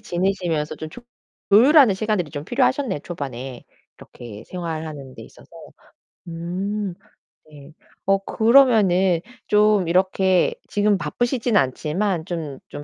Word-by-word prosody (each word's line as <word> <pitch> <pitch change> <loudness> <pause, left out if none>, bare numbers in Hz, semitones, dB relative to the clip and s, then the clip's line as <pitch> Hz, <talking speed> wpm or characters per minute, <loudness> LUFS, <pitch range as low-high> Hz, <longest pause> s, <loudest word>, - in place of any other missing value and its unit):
지내시면서 175 -4 -2
좀 155 - -7
조 245 - -11 0.5
조율하는 250 +2 +6
시간들이 195 -5 -2
좀 145 0 -6
필요하셨네요 255 - 0
초반에 135 -6 -7 0.3
이렇게 115 -3 -12
생활하는 155 -6 -6
데 - - -11
있어서. - - -17 0.8
음 185 +4 -4 0.6
네. 145 0 -14 0.3
어 195 0 +3
그러면은 215 -8 +4 0.3
좀 210 -3 +3
이렇게 185 +1 +2 0.2
지금 205 0 +2
바쁘시지는 235 - 0
않지만 160 +7 -1
좀 160 -6 -5
좀 145 - -8
180 Hz, 275 characters per minute, -22 LUFS, 155-210 Hz, 0.8 s, 조율하는